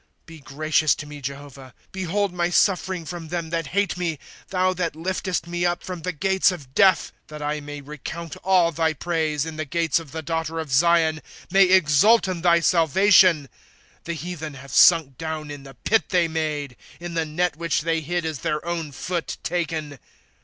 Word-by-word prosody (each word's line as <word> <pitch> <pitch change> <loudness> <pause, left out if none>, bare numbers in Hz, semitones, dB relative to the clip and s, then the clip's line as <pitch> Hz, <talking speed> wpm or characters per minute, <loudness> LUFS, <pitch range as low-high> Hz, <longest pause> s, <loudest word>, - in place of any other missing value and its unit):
^^ - - -45
Be 165 -1 -12
gracious 150 +1 +1
to 145 - -8
me, 145 -1 -10
Jehovah; 140 -1 -8 0.2
Behold 190 +1 -1
my 175 -1 0
suffering 185 -1 +1
from 170 -1 -7
them 170 -1 -4
that 165 -2 -2
hate 200 +4 0
me, 170 -3 -2 0.3
Thou 185 0 +1
that 175 -3 -2
Hftest 185 +1 -2
me 175 0 -3
up 175 0 0
from 180 -2 -6
the 180 +3 -2
gates 190 +4 +2
of 140 -8 -9
death; 190 +4 +4
^* - - -45
That 150 -1 -8
I 150 +1 -2
may 145 0 -8
recount 150 +3 -7
all 180 -3 +3
thy 160 0 0
praise, 155 -2 -1
In 160 -1 -7
the 155 - -2
gates 165 +2 0
of 160 -4 -12
the 160 +1 -5
daughter 165 +1 -3
of 155 -4 -5
Zion, 160 +2 +3 0.2
— - - -20
May 195 +1 +6
exult 185 +5 +4
in 180 -3 -3
thy 170 -1 +4
salvation. 170 -1 +4 0.5
^^ - - -43
The 170 - -3
heathen 160 -3 -6
have 140 0 -11
sunk 160 -7 +5
down 160 -2 -5
in 145 -1 -8
the 135 -1 -13
pit 215 - +1
they 175 -3 +2
made; 150 -5 -3 0.2
In 175 0 -7
the 165 -1 0
net 165 +2 -1
which 165 -1 -1
they 165 0 0
hid 175 +2 -2
is 160 -4 -3
their 150 +1 -2
own 170 -3 -3
foot 175 +5 -4
taken. 160 -5 -3
165 Hz, 200 wpm, -23 LUFS, 150-175 Hz, 0.5 s, May